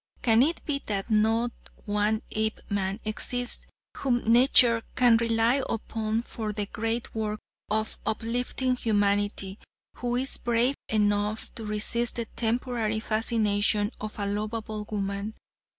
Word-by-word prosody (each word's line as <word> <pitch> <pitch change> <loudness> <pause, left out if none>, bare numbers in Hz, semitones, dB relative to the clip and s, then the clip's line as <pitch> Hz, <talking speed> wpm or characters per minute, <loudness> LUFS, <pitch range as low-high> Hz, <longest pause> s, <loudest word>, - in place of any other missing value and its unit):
Can 225 -1 +5
it 320 +5 +1
be 280 -2 -1
that 200 +1 -2
not 225 +3 +3 0.3
one 210 +1 +1
Apeman 205 -2 -1
exists 245 +3 -1 0.3
whom 255 -3 +2
nature 235 0 +6
can 240 -2 +6
rely 230 +3 +2
upon 225 0 -1
for 220 -3 -4
the 210 -1 -2
great 225 +3 -2
work 215 -1 -2 0.3
of 220 +1 -1
uplifting 245 +3 0
humanity, 205 -3 0 0.4
who 245 0 -1
is 260 +2 0
brave 240 +2 +2 0.2
enough 210 0 +1
to 225 - -7
resist 215 +3 0
the 235 - -2
temporary 230 -1 0
fascination 215 -1 +1
of 215 0 -5
a 205 - -2
lovable 215 +1 -3
woman? 200 +1 -3
220 Hz, 125 wpm, -27 LUFS, 210-235 Hz, 0.4 s, nature